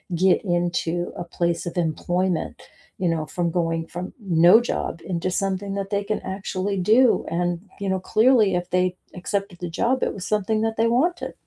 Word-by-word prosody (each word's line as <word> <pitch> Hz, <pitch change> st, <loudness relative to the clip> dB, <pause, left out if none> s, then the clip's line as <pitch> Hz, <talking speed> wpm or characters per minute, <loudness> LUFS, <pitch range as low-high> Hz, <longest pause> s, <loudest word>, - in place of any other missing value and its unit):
get 185 Hz, +2 st, +3 dB
into 175 Hz, -1 st, -1 dB
a 175 Hz, -, -3 dB
place 170 Hz, 0 st, -2 dB
of 175 Hz, -, -5 dB
employment, 175 Hz, +1 st, -1 dB, 0.4 s
you 180 Hz, -2 st, +1 dB
know, 160 Hz, -2 st, -1 dB
from 170 Hz, +2 st, -2 dB
going 165 Hz, -1 st, -1 dB
from 180 Hz, +1 st, -6 dB
no 180 Hz, +1 st, +5 dB
job 205 Hz, -7 st, -3 dB
into 180 Hz, 0 st, -2 dB
something 195 Hz, +1 st, -2 dB
that 195 Hz, 0 st, -3 dB
they 200 Hz, -1 st, 0 dB
can 215 Hz, +1 st, -2 dB
actually 190 Hz, +1 st, -3 dB
do, 225 Hz, +7 st, +4 dB
and, 175 Hz, 0 st, -1 dB, 0.2 s
you 200 Hz, -1 st, -2 dB
know, 190 Hz, 0 st, 0 dB
clearly 220 Hz, 0 st, +4 dB
if 175 Hz, 0 st, -2 dB
they 180 Hz, 0 st, +1 dB, 0.2 s
accepted 195 Hz, +1 st, -3 dB
the 175 Hz, -, -4 dB
job, 245 Hz, +9 st, +1 dB
it -, -, 0 dB
was 195 Hz, -2 st, -6 dB
something 215 Hz, +1 st, 0 dB
that 225 Hz, 0 st, -1 dB
they 225 Hz, -, +3 dB
wanted. 310 Hz, +10 st, 0 dB
185 Hz, 185 wpm, -23 LUFS, 175-205 Hz, 0.4 s, no